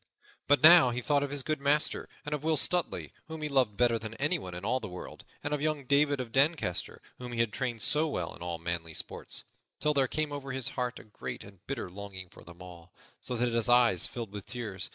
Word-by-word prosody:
But 145 +1 +4
now 165 -5 +10
he 120 +1 -2
thought 145 +3 +2
of 145 - -1
his 140 -1 -1
good 155 -1 -2
master 145 +2 +2 0.2
and 150 - -3
of 150 -1 -3
Will 160 0 +2
Stutely, 175 +4 +1 0.2
whom 160 -1 -6
he - - 0
loved 130 -7 +2
better 120 -2 +3
than 110 0 -7
anyone 135 - -1
in 90 +2 -6
all 125 +4 +1
the - - -6
world, 90 0 -9 0.2
and 145 - -1
of 145 - -1
young 155 -2 -1
David 145 +1 +3
of 125 -3 -4
Doncaster, 135 - 0 0.2
whom 125 -1 -6
he 115 - -3
had 115 -2 +1
trained 120 -5 -2
so 155 +7 +4
well 90 - -3
in - - -16
all 85 -1 -3
manly 80 -1 -4
sports, - - -5 0.4
till 150 0 +2
there 135 -2 +3
came 155 +2 -1
over 140 -2 -5
his 130 -2 -1
heart 125 0 -3
a - - -10
great 65 - -7
and 100 -1 -15
bitter 140 - -3
longing 95 -1 -8
for - - -15
them 85 +1 -12
all, 85 -1 -12 0.3
so 125 - -3
that 120 0 0
his 115 0 +1
eyes 120 -7 +5
filled 115 -4 -6
with 100 -1 -8
tears. 110 -7 -4
125 Hz, 235 wpm, -30 LUFS, 100-145 Hz, 0.4 s, now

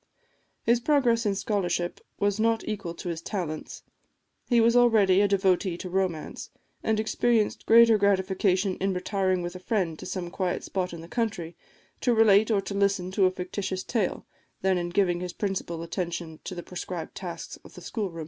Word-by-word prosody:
His 235 +1 +3
progress 240 -4 +2
in 200 - +1
scholarship 185 -4 -1 0.2
was 205 0 +1
not 225 0 +1
equal 195 -6 -4
to 175 - -6
his 165 -1 -4
talents; 170 -6 -5 0.7
he 240 -2 +4
was 230 +1 +4
already 215 -6 +5
a 205 - +4
devotee 190 -2 +1
to 180 0 -7
romance, 185 -4 -2 0.3
and 220 -1 +1
experienced 220 0 +1
greater 230 -1 +7
gratification 190 -1 +2
in 195 0 -1
retiring 185 -1 0
with 175 +1 -5
a - - -6
friend 180 -5 -1
to - - -7
some 175 -2 -4
quiet 185 -1 -2
spot 185 -2 -2
in 170 -1 -8
the 165 - -10
country, 180 -6 -3 0.4
to 245 -3 +2
relate 220 -1 +5
or 210 -3 +2
to 195 +1 -6
listen 200 -2 +1
to 190 0 +3
a - - 0
fictitious 185 +1 -4
tale, 220 -6 -1 0.4
than 190 -1 +3
in 175 0 -3
giving 175 -1 +1
his 180 -1 -5
principal 185 -5 -3
attention 170 -2 -4
to 185 - -5
the 175 - -6
prescribed 180 -2 -6
tasks 175 -3 -7
of - - -15
the - - -10
schoolroom. 195 -8 -4
190 Hz, 180 wpm, -27 LUFS, 180-215 Hz, 0.7 s, greater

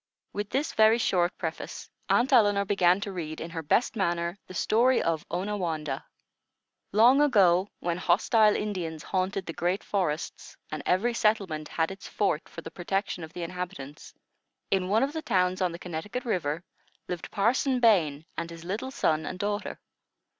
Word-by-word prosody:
With 205 0 -3
this 280 +3 -1
very 220 +1 +5
short 180 -6 +1
preface, 165 -1 -5 0.2
Aunt 260 +4 +3
Elinor 205 -4 +5
began 185 -2 +3
to 200 - -4
read, 160 -4 -5
in 165 - -6
her 165 -1 -4
best 220 +12 +1
manner, 175 -2 -1
the 185 - -10
story 245 +7 +3
of 165 -2 0
ONAWANDAH. 175 -5 -2 0.9
Long 240 +7 +6
ago, 195 -9 +4
when 175 0 -1
hostile 215 +3 +4
Indians 175 -7 -3
haunted 190 0 -1
the 165 - -5
great 180 +5 -1
forests, 170 -6 -3
and 155 - -4
every 220 +7 +2
settlement 195 -9 0
had 160 +2 -1
its 195 -1 -9
fort 195 -6 -1
for 165 - -8
the - - -9
protection 195 0 -2
of 160 0 -9
the 175 - -5
inhabitants, 175 -5 -7 0.6
in 185 -1 +1
one 220 +4 +3
of 280 +2 -1
the 320 - -3
towns 185 -7 +1
on 180 -2 +2
the 170 - -6
Connecticut 180 - -5
River, 170 -7 -1 0.4
lived 175 -2 -5
Parson 250 +5 +1
Bain 165 -11 +3
and 165 0 -4
his 165 0 -10
little 210 +8 -3
son 160 -11 0
and 185 - -5
daughter. 205 +1 -3
185 Hz, 170 wpm, -28 LUFS, 170-210 Hz, 0.9 s, Long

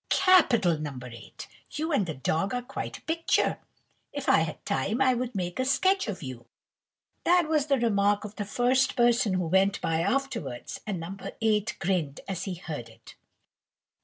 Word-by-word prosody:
"Capital, 235 - +4
No. 145 -3 -5
8! 120 -2 -10 0.2
you 315 +2 -3
and 210 - +1
the 160 - -4
dog 160 - -1
are 245 - -2
quite 270 +2 -6
a - - -21
picture. 330 +1 +1 0.5
If 285 -1 -5
I - - +6
had 160 -1 -3
time, 215 +6 -1
I 260 -1 +4
would 250 -1 -3
make 180 +1 -3
a - - +2
sketch 375 +7 +2
of 195 -6 -5
you." 130 -3 -8 0.8
That 350 -2 +4
was 305 -2 +1
the 275 -2 +3
remark 205 -3 +2
of 210 0 -9
the 205 - -3
first 250 +5 +2
person 240 -4 +3
who 180 -1 0
went 190 +4 +2
by 160 0 0
afterwards, 200 - -2
and 195 -4 -2
No. 170 +4 -6 0.2
8 215 -1 +1
grinned 175 -7 -1
as 190 -2 -3
he 190 -3 -3
heard 150 -9 -7
it. 115 0 -16
205 Hz, 180 wpm, -27 LUFS, 165-260 Hz, 0.8 s, I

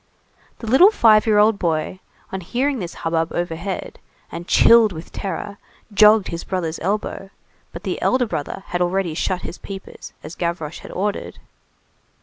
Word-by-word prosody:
The - - -9
little 265 - +7
five 225 - +4
year 215 -1 +4
old 210 0 +4
boy, 165 +1 -1 0.3
on 190 - -4
hearing 255 +9 -1
this 175 -3 -6
hubbub 165 0 0
overhead, 175 +2 -4 0.3
and 170 +1 -7
chilled 230 -2 +6
with 160 -1 -9
terror, 200 +1 -5 0.3
jogged 210 0 +6
his 170 0 -5
brother's 170 -4 -3
elbow; 195 +1 -3 0.4
but - - -9
the - - -3
elder 255 -1 +2
brother 190 -2 -5
had 175 - -2
already 180 -1 0
shut 180 +3 -2
his - - -7
peepers, 195 -1 -9
as 155 - -8
Gavroche 170 -3 -4
had - - -11
ordered. 205 +2 -3
190 Hz, 155 wpm, -21 LUFS, 170-215 Hz, 0.4 s, little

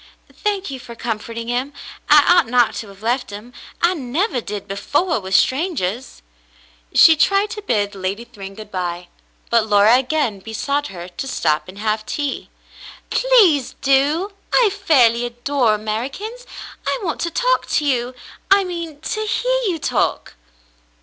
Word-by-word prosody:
'* - - -26
Thank 400 -6 -1
you 265 - -6
for 235 -1 -11
comforting 230 0 -5
him. 250 +4 -2 0.4
I 295 -1 +7
ought 350 -2 +5
not 245 0 +3
to 220 - -6
have 200 +1 -15
left 245 +3 -1
him. 210 +5 -10 0.3
I 345 +2 +4
nevah 290 - -1
did 205 -2 -6
before, 280 - 0
with 190 -1 -2
strangahs." 260 - 0 0.7
She 325 - +7
tried 395 +6 +2
to 425 - -6
bid 210 - -1
Lady 195 +4 -4
Thryng 195 -4 -10
good 215 0 -11
by, 175 -1 -4 0.4
but 230 -2 +3
Laura 210 +2 +5
again 260 -6 -1
besought 280 +8 -2
her 175 -2 -8
to 180 +9 -7
stop 155 - 0
and 185 +2 -11
have 215 0 -1
tea. 290 -2 -3 0.6
"Please 360 - +3
do. 290 +8 +2 0.2
I 465 -5 +4
fairly 255 - +3
adore 240 -1 0
Americans. 270 - -5 0.4
I - - +1
want 330 -4 -3
to 340 - -1
talk - - +1
to 300 - 0
you; 250 -2 0 0.3
I 395 0 +5
mean, 335 -5 -6
to 430 +6 -3
hear - - +1
you 350 -4 0
talk." - - -1
255 Hz, 155 wpm, -20 LUFS, 215-335 Hz, 0.7 s, I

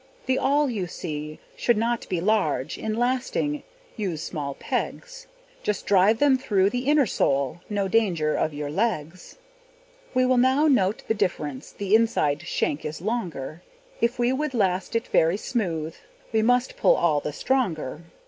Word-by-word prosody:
The 260 - +1
awl, 290 +2 +2
you 210 -8 -2
see, 155 -3 -6 0.2
should 240 -3 +2
not 230 +1 -1
be 180 - 0
large; 165 -8 +1
In 220 0 -3
lasting 260 +4 0 0.3
use 180 -8 -3
small 140 -4 -4
pegs; - - -4 0.3
Just 210 -3 -2
drive 200 +3 +4
them 270 0 +4
through 200 -6 +2
the 250 +1 -3
inner 295 -2 +5
sole, 140 - 0
No 200 -2 0
danger 180 -8 +1
of 155 - 0
your 145 0 -5
legs. 180 -3 -2 0.8
We 255 0 +4
will 255 -1 +3
now 260 +4 +4
note 210 -8 +2
the - - +2
difference: 150 -9 -2
The 200 0 -3
inside 220 -10 +3
shank 145 - -1
is 150 - -5
longer; 175 - -4 0.4
If 235 +2 +1
we 240 +1 +2
would 290 0 -2
last 190 -2 0
it 230 - +1
very 165 +4 +3
smooth, 165 -10 -2 0.4
We 220 - +3
must 245 +3 +2
pull - - +5
all 155 -4 +2
the 150 - -4
stronger. 160 - -1
205 Hz, 160 wpm, -25 LUFS, 160-245 Hz, 0.8 s, inner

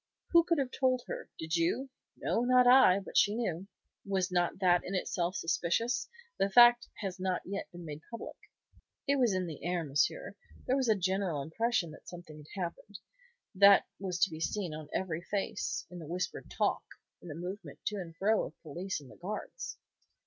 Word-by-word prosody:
"Who 340 -1 +7
could 335 -1 +1
have 270 -3 -1
told 255 -2 +1
her? - - -6
Did 160 +1 -2
you?" 180 +11 0 0.3
"No, - - 0
not 250 0 +5
I. 245 -7 +7
But - - -11
she 210 0 +3
knew." 195 -6 -2 0.4
"Was 190 -2 -1
not 175 -1 +1
that 180 -2 +3
in 195 - -4
itself 180 0 -1
suspicious? 180 +8 0 0.3
The 195 - +2
fact 240 +3 +7
has 190 -3 -4
not 185 -1 -1
yet 200 +2 -4
been 175 -1 -10
made 150 -1 -7
public." 230 - -7 0.7
"It 280 0 +3
was 245 -4 +4
in 185 -1 0
the 160 -4 -8
air, 175 -1 -1
monsieur. 150 - 0 0.3
There 255 - +2
was 265 -3 +1
a 220 - +5
general 185 -5 -1
impression 220 - 0
that 155 - -14
something 175 -3 -10 0.2
had - - -6
happened. 185 +4 -7 0.6
That 200 0 +7 0.2
was 185 -2 -3
to 195 - +4
be 155 - -7
seen 180 -1 -2
on 155 -1 -8
every 170 -3 -2
face, 195 +2 -3
in 180 - -8
the 160 - -8
whispered 180 +3 -4
talk, - - 0 0.4
the 165 -4 -8
movement 180 +4 -7
to 210 - -1
and 165 -4 -7
fro 215 +4 +2
of - - -13
the - - -50
police 175 +5 -4
and 135 - -14
the - - -15
guards." 215 - -6
190 Hz, 190 wpm, -32 LUFS, 170-225 Hz, 0.7 s, Who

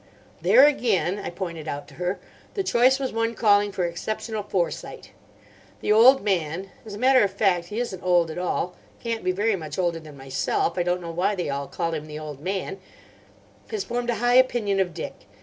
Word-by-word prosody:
"There, 270 - +7
again," 205 - +1
I - - -4
pointed 170 -3 -6
out 145 -1 -5
to - - -16
her, 180 +2 -1 0.4
"the 395 - 0
choice 255 -2 +4
was 265 -3 -3
one 230 0 -1
calling 205 -2 +3
for 180 -2 -1
exceptional 215 +5 -3
foresight. 185 -4 -3 0.7
The - - 0
old 240 +4 +7
man—as 190 +2 -3
a - - -7
matter 255 +3 +5
of 200 - +2
fact, 190 -3 +1
he 210 +5 -4
isn't 195 -7 -3
old 175 -3 +2
at 165 - -5
all; 180 0 -1 0.3
can't 230 -1 -3
be 185 - +2
very 205 +3 +1
much 155 -5 -7
older 175 -3 0
than 155 -3 -12
myself; 135 +5 -1
I 180 - 0
don't 180 +1 0
know 170 -1 -6
why 180 +5 0
they 175 -6 -2
all 140 0 -3
call 165 +3 -3
him 155 -1 -4
the 150 0 -7
old 150 -3 -7
man—has 195 - -7
formed 240 0 -3
a 240 - +1
high 245 +3 +1
opinion 235 -6 +3
of 180 -4 0
Dick. - - -5
190 Hz, 200 wpm, -25 LUFS, 170-225 Hz, 0.7 s, There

